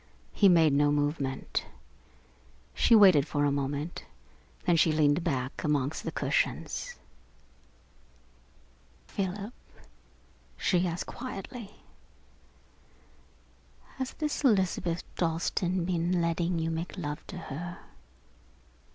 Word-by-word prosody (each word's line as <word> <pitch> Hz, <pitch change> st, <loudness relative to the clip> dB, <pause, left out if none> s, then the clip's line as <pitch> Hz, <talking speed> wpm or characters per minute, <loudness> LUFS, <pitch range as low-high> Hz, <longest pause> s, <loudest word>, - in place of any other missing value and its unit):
He 200 Hz, -, +5 dB
made 165 Hz, -4 st, +5 dB
no 145 Hz, +1 st, +4 dB
movement. 145 Hz, -2 st, -1 dB, 1.1 s
She 230 Hz, -, +5 dB
waited 185 Hz, -9 st, +7 dB
for 145 Hz, -1 st, +1 dB
a 145 Hz, -, +2 dB
moment, 140 Hz, +3 st, -3 dB, 0.6 s
then 175 Hz, -3 st, +4 dB
she 160 Hz, 0 st, +4 dB
leaned 155 Hz, +1 st, +3 dB
back 130 Hz, -5 st, -2 dB
amongst 145 Hz, -1 st, 0 dB
the -, -, -3 dB
cushions. -, -, -1 dB, 2.1 s
"Philip," 200 Hz, +3 st, -4 dB, 1.0 s
she 180 Hz, -1 st, +2 dB
asked 170 Hz, +1 st, -3 dB
quietly, 230 Hz, -2 st, -8 dB, 2.1 s
"has 260 Hz, -1 st, -3 dB
this 300 Hz, -1 st, -3 dB
Elizabeth 185 Hz, -7 st, +2 dB
Dalstan 170 Hz, +1 st, 0 dB
been 175 Hz, 0 st, 0 dB
letting 170 Hz, +1 st, 0 dB
you 165 Hz, 0 st, -1 dB
make 165 Hz, +4 st, -4 dB
love 150 Hz, -3 st, -4 dB
to 190 Hz, -, -7 dB
her?" 175 Hz, +2 st, -6 dB
170 Hz, 100 wpm, -29 LUFS, 150-190 Hz, 2.1 s, waited